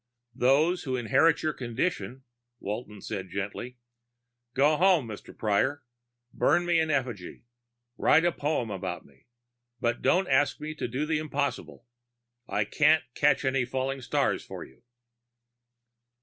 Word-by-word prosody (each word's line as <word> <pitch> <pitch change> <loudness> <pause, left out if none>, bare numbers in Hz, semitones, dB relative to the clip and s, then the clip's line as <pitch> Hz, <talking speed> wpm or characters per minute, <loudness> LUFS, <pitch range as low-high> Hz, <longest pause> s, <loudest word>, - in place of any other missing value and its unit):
"Those 145 +8 +3
who 130 -3 -2
inherit 125 +7 +3
your 155 - 0
condition," 125 - -3 0.4
Walton 105 0 -6
said 95 -3 -5
gently. 105 +7 -5 0.8
"Go 145 +3 +4
home, 180 -7 +4
Mr. 110 -2 -10
Prior. 130 +7 +1 0.5
Burn 175 0 +2
me 170 -1 +3
in 160 -1 +1
effigy. 125 - -3 0.6
Write 160 +3 +5
a 175 - +4
poem 145 -8 -2
about 95 -2 -5
me. 70 -1 -24 0.5
But 120 0 -1
don't 185 +1 +3
ask 140 +2 +2
me 155 +1 -5
to 155 - -4
do 130 +5 -2
the 155 0 0
impossible. 145 -5 -3 0.6
I 105 - 0
can't 150 +7 +3
catch 145 0 +2
any 130 -1 +2
falling 130 +2 -3
stars - - 0
for - - -8
you." 65 - -17
135 Hz, 135 wpm, -28 LUFS, 115-155 Hz, 0.8 s, Write